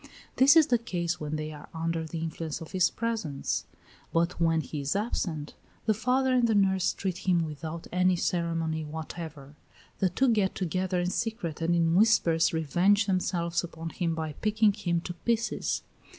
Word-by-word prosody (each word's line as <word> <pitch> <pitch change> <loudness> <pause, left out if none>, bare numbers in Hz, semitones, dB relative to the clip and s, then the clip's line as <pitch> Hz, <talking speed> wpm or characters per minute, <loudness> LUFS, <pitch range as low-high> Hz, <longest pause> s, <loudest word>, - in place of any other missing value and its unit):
This 275 +3 +7
is 320 -2 +8
the 245 -5 +2
case 175 -6 -2
when 150 0 -3
they 155 0 -4
are 150 -1 -11
under 165 0 -1
the 165 - -5
influence 160 -1 -4
of 165 - -9
his 185 -3 +3
presence: 220 -12 -2 0.5
but 170 +1 0
when 165 -1 +3
he 155 - -6
is 140 +6 -1
absent, 175 -8 -2 0.3
the 220 - +3
father 255 +4 +1
and 245 -2 +4
the 220 - +2
nurse 190 -2 +3
treat 190 -1 -4
him 170 -2 +3
without 160 +2 -6
any 185 0 +3
ceremony 165 -2 -1
whatever. 155 -2 -7 0.5
The 190 - +3
two 255 +9 +2
get 210 -4 +2
together 185 0 -1
in 175 +1 0
secret 220 -10 -3
and 170 +1 +2
in 165 -1 +2
whispers 175 -5 +4
revenge 175 +6 +2
themselves 175 -3 0
upon 165 -1 -6
him 165 -1 -1
by 160 -2 -3
picking 215 +3 +2
him 175 -5 -1
to 175 - -5
pieces. 230 +6 -1
175 Hz, 175 wpm, -28 LUFS, 160-205 Hz, 0.5 s, is